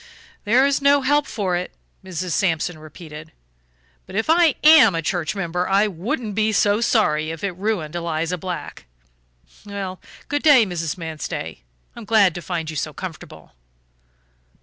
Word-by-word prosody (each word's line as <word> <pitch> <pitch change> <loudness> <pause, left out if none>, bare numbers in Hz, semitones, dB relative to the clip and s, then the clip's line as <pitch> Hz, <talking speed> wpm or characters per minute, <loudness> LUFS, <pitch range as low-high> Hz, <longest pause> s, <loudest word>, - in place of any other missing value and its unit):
"There 245 +6 +4
is 280 0 +1
no 280 0 +4
help 290 +2 +2
for 190 -5 -2
it," 180 +1 -4 0.3
Mrs. 185 -1 -5
Sampson 165 -2 0
repeated, 155 0 -11 0.8
"but - - -10
if 225 +9 +1
I 330 -3 +4
AM 295 - +7
a 165 - -1
church 175 +4 -2
member, 180 -2 -2
I 200 +2 +4
wouldn't 210 +3 -3
be 215 +1 +1
so 205 +1 +2
sorry 155 -10 +1
if 165 +2 -7
it 200 - -1
ruined 190 -6 -2
Eliza 170 +1 -2
Black. 180 0 -6 0.8
Well, 195 -2 -6 0.3
good 290 0 -1
day, 280 -7 +6
Mrs. 170 -3 -4
Manstey; 160 - -6 0.3
I'm 235 - -9
glad 205 -5 +4
to 175 - -6
find 170 -2 -4
you - - -8
so 155 0 -3
comfortable." 175 -2 -9
185 Hz, 155 wpm, -21 LUFS, 165-220 Hz, 0.8 s, AM